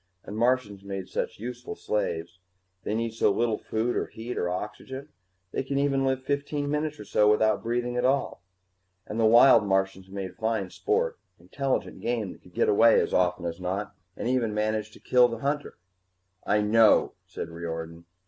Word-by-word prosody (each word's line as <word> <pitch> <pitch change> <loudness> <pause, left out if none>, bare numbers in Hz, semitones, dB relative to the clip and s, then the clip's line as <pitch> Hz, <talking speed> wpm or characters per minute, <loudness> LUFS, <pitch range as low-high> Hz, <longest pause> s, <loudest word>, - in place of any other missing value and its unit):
And 105 - -8
Martians 115 -4 +1
made 95 -1 -5
such - - -3
useful 120 +3 -6
slaves 85 -4 -3 0.4
they 105 - -2
need 115 0 -1
so 110 - +3
little 115 +1 0
food 115 +2 -1
or - - -1
heat 120 +2 -7
or 90 - -1
oxygen, 130 +9 -6 0.4
they - - -1
can 135 +1 -3
even 140 -1 +2
live 130 0 0
fifteen 145 +1 -2
minutes 150 0 -2
or 105 - -8
so 105 +1 +3
without 110 0 +3
breathing 120 +1 -1
at 125 - 0
all. 135 -4 +1 0.6
And 105 - -5
the 110 - +5
wild 120 +1 +7
Martians 95 -1 0
made 95 -1 -5
fine 110 -4 -1
sport 465 +2 -1 0.2
intelligent 135 -1 -3
game, 115 -5 -1
that - - -19
could 90 - -19
get - - +2
away 115 +3 +6
as - - -1
often 90 -1 +1
as 85 +1 -4
not, 95 +3 -3 0.2
or - - -4
even 120 -3 0
manage 110 0 -1
to - - -15
kill 125 -1 +5
the 115 -1 -5
hunter." 145 +4 -3 0.7
"I 105 0 +3
know," 110 +1 +4
said 85 - -6
Riordan. 85 0 -6
110 Hz, 180 wpm, -27 LUFS, 100-130 Hz, 0.7 s, wild